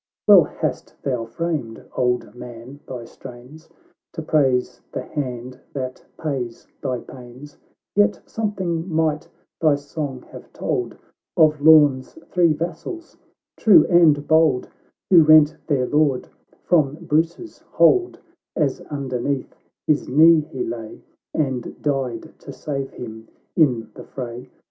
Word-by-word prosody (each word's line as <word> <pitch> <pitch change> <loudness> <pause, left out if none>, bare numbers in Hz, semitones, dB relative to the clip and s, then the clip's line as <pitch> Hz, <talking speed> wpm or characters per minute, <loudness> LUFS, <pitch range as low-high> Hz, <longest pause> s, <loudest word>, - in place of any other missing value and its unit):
Well - - +8
hast - - -4
thou 125 -4 -2
framed, 135 -3 -4
Old 125 -4 0
Man, 125 +2 -10
thy 125 -3 -7
strains, 130 +6 -13 0.4
To 160 - -5
praise 135 -5 +1
the - - -4
hand 125 -3 -5
that 130 -2 -5
pays 130 -7 -4
thy 130 -1 -2
pains 130 +3 -12 0.4
;u - - +6
Yet 105 0 +1
something 190 -6 -3
might 155 -1 0 0.3
thy 155 -3 +4
song 145 -2 -6
have - - -12
told - - -3 0.4
Of 155 -2 +4
Lorn's 145 -4 +5 0.2
three 175 -3 +4
vassals 175 - -5 0.4
true 185 -8 +6
and 155 -4 +5
bold, 160 -5 +3 0.4
W 175 -3 +9
ho 155 - -2
rent 155 -1 +7
their 135 -4 +1
Lord 145 -2 +1 0.3
from 150 -5 +2
Eruce's 165 - -2
hold, 370 -2 +2 0.4
As 145 -4 0
underneath 135 -1 -3 0.3
his 150 -1 +1
knee 160 +4 +6
he 140 -4 -5
lay, 115 -1 -7 0.3
And 135 -6 -2
died 135 -5 -2
to 140 - -10
save 135 0 -4
him 110 -2 -9 0.3
in 120 -9 +2
the - - -11
fray. 125 -2 -7
145 Hz, 130 wpm, -22 LUFS, 125-160 Hz, 0.4 s, W